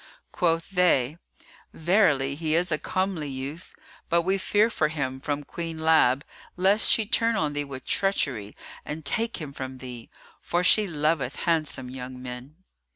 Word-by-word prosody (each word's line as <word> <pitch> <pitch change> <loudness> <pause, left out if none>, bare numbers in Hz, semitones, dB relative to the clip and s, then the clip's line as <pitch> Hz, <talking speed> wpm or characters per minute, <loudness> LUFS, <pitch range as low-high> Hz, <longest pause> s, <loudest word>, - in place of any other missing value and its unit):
Quoth 165 0 +1
they, 170 -5 +2 0.5
"Verily, 160 -6 +2
he 155 +1 -1
is 175 +1 +2
a 155 - +1
comely 185 -3 -2
youth; 135 +5 -6 0.4
but 170 0 +3
we 190 +2 +1
fear 210 +3 +3
for 155 - +1
him 140 -4 -3
from 145 +1 -3
Queen 165 +2 -5
Lab, 160 -3 +3 0.3
lest 195 +4 +4
she 220 - +4
turn 230 +2 +2
on 150 -8 0
thee 145 0 -1
with 135 -2 -8
treachery 130 - 0 0.3
and 155 0 -7
take 230 +9 +1
him 150 -4 -7
from 130 -1 -6
thee, 125 -3 -9 0.3
for 175 +1 -1
she 210 +3 +5
loveth 150 -5 0
handsome 155 -6 -1
young 130 0 -7
men." 125 +3 -8
155 Hz, 155 wpm, -26 LUFS, 135-180 Hz, 0.5 s, she